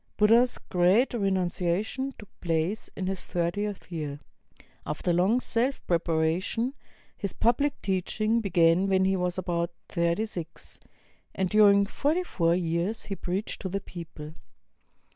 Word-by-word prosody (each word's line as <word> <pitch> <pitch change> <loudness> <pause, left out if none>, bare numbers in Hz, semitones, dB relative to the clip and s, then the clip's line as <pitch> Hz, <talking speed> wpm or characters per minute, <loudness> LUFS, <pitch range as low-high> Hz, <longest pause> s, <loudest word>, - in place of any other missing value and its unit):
Buddha's 230 +4 +4
Great 185 +9 +2
Renunciation 195 +4 0
took 210 - -11
place 170 +5 -1
in 190 - -3
his 190 -1 -3
thir 170 -1 -1
tieth 205 0 -4
year. 150 -4 -4 0.6
After 155 +4 -1
long 190 +8 +3
self 250 +2 -1
preparation, 170 +8 0 0.4
his 200 - -4
public 280 +5 +1
teach 190 +1 -2
ing 220 +2 +2
began 175 -1 +3
when 190 -1 +3
he 190 0 +2
was 180 -1 -1
about 170 -2 -1 0.2
thirty 170 +5 +1
six, 170 -6 -7 0.6
and 190 -1 -1
during 200 -1 +6
forty 300 - 0
four 170 - +1
years 175 +5 -1
he 195 - -4
preached 190 +3 -4
to 190 - -3
the 200 +2 -2
people. 165 -5 -9
190 Hz, 140 wpm, -27 LUFS, 170-215 Hz, 0.6 s, during